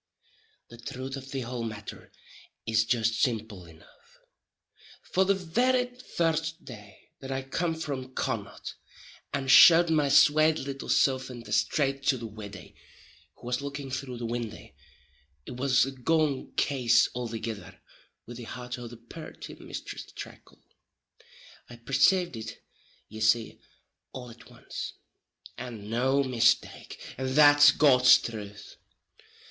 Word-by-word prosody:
The 120 - -12
truth 130 +3 -6
of 135 -1 -9
the 135 -1 -4
houl 120 0 -5
matter 110 -2 -8 0.5
is 110 0 +2
jist 115 -1 0
simple 110 -7 -2
enough; 80 -1 -20 0.9
for 190 +1 +1
the 200 +1 +3
very 245 +8 0
first 165 -9 -2
day 105 -4 -13
that 135 0 -8
I 135 0 -2
com'd 160 +4 -2
from 130 -3 -6
Connaught, - - -4 0.6
and 135 -1 -3
showd 165 +4 +8
my 150 -3 +2
swate 155 +3 +5
little 135 0 -6
silf 130 -1 +2
in 120 -2 -8
the 115 - -12
strait 135 -2 +1
to 135 - +3
the 115 - -7
widdy, 105 -4 -10 0.6
who - - -16
was 125 +2 -2
looking 140 -1 -6
through 130 -1 -5
the 120 - -5
windy, 115 -1 -5 0.7
it 125 - -8
was 130 -2 +3
a 135 - -5
gone 145 +1 0
case 120 -4 +3
althegither 115 -3 -5 0.5
with 120 0 -9
the 120 - -8
heart 125 +1 -7
o' 120 - -7
the 120 0 -11
purty 120 +8 -10
Misthress - - -8
Tracle. - - -12 1.1
I 120 - -10
percaved 135 +8 +2
it, 110 0 -8 0.4
ye 110 - -10
see, 110 +1 +1 0.5
all 125 -2 -8
at 115 - -16
once, - - -7 0.7
and 115 -4 -8
no 130 +4 +2
mistake, 120 -3 0 0.2
and 130 0 -2
that's 145 -1 +8
God's 130 -3 +6
truth. 105 -3 -8
130 Hz, 135 wpm, -28 LUFS, 115-145 Hz, 1.1 s, showd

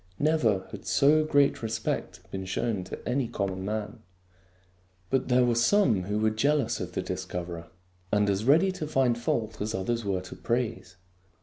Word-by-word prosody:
Never 125 -11 +2
had - - -9
so 150 +2 +4
great 145 -2 +3
respect 110 -1 -3
been 95 -1 -4
shown 95 +1 -1
to - - -8
any 125 0 0
common 95 -3 -3
man. 105 +1 -4 1.1
But 135 -1 +1
there 125 -1 +4
were 120 - +2
some 120 - +3
who 105 +2 -1
were 110 0 +2
jealous 140 +4 +1
of - - -5
the - - -2
dis - - -4
coverer, 85 -1 -6 0.4
and 105 0 +3
as 100 +1 0
ready 160 +10 +4
to 160 -4 -5
find 130 -5 +2
fault 110 -2 -2
as 105 +1 -2
others 115 +5 -1
were 95 -2 -1
to 90 - -10
praise. 115 -6 -2
115 Hz, 175 wpm, -28 LUFS, 100-135 Hz, 1.1 s, so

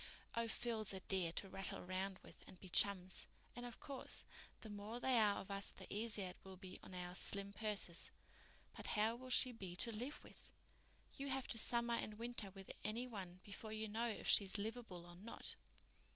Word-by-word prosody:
"Oh, 230 0 +2
Phil's 225 -3 0
a 190 - -2
dear 185 -4 +2
to 195 - 0
rattle 195 0 0
round 190 +1 0
with - - -12
and 185 - -11
be 190 - -8
chums. 185 0 +3 0.3
And, 245 0 -3
of 240 - -8
course, 275 -3 -3 0.4
the 220 - -5
more 205 +3 -4
there 245 -2 +6
are 205 -1 +4
of 195 - -6
us 195 0 +2
the - - -7
easier 210 -3 +1
it 180 - -9
will 190 -1 -8
be 185 0 -7
on 185 - -8
our 180 0 -3
slim 200 +1 0
purses. 205 -5 -1 0.7
But - - -4
how 220 +2 +5
will 255 +1 -8
she 255 0 +6
be 190 -7 -5
to 230 +6 +3
live 245 +7 -3
with? - - -11 0.6
You 275 - -2
have 265 -1 0
to - - +3
summer 235 +1 +3
and 215 -2 0
winter 230 -3 -1
with 195 0 -8
any 230 +4 0
one 185 -6 -6
before 215 +2 -5
you 220 0 0
know 225 +3 +1
if 220 - -2
she's 200 0 +7
livable 210 -4 -3
or 175 0 -10
not." 215 +5 -2
210 Hz, 200 wpm, -43 LUFS, 190-235 Hz, 0.7 s, she's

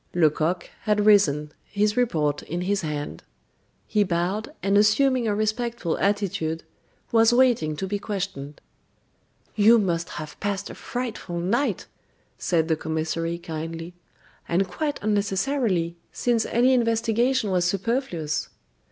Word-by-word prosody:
Lecoq 165 +1 +2 0.2
had 210 -1 +2
risen, 150 -8 +4
his 210 0 0
report 155 -12 +1
in 170 +3 -4
his 200 +2 0
hand; 150 -3 -4 0.6
he 210 -1 +2
bowed, 185 - -1
and 195 +1 +2
assuming 235 +4 +4
a 205 - +1
respectful 215 -3 -1
attitude, 190 -5 0 0.5
was 225 0 +5
waiting 240 -12 +3
to 190 - -3
be 200 +2 -2
questioned. 190 -9 -5 1.0
"You 220 +2 +6
must 170 -5 0
have 155 -1 -7
passed 200 -1 -2
a - - -8
frightful 230 -8 -5
night," 230 +11 0 0.5
said 165 -3 +1
the 160 - +2
commissary, 160 +2 -2
kindly; 165 +1 -6 0.6
"and 185 +3 +2
quite 290 - -2
unnecessarily, 200 -3 0
since 235 -2 0
any 250 +3 +3
investigation 230 -1 +1
was 180 -1 +2
superfluous." 190 - -1
200 Hz, 125 wpm, -25 LUFS, 165-225 Hz, 1.0 s, You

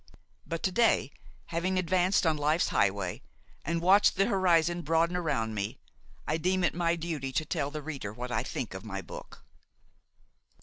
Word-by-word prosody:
But 165 0 -4
to 190 - +1
day, 225 - +3 0.4
having 185 +3 0
advanced 185 +1 +2
on 160 -1 +3
life's 150 +3 +1
highway 95 -2 0 0.4
and 170 0 -2
watched 200 +3 +5
the 195 0 +3
horizon 175 -3 +2
broaden 165 +2 +1
around 115 -11 -1
me, 100 -1 -3 0.5
I 155 - 0
deem 185 +3 +1
it 175 - +2
my 170 0 +1
duty 160 -5 -4
to 155 - 0
tell 140 -1 -1
the 150 0 -6
reader 140 -9 -5
what 125 +3 -6
I - - +1
think - - -4
of - - -7
my - - -5
book. - - -10
165 Hz, 170 wpm, -29 LUFS, 145-180 Hz, 0.5 s, watched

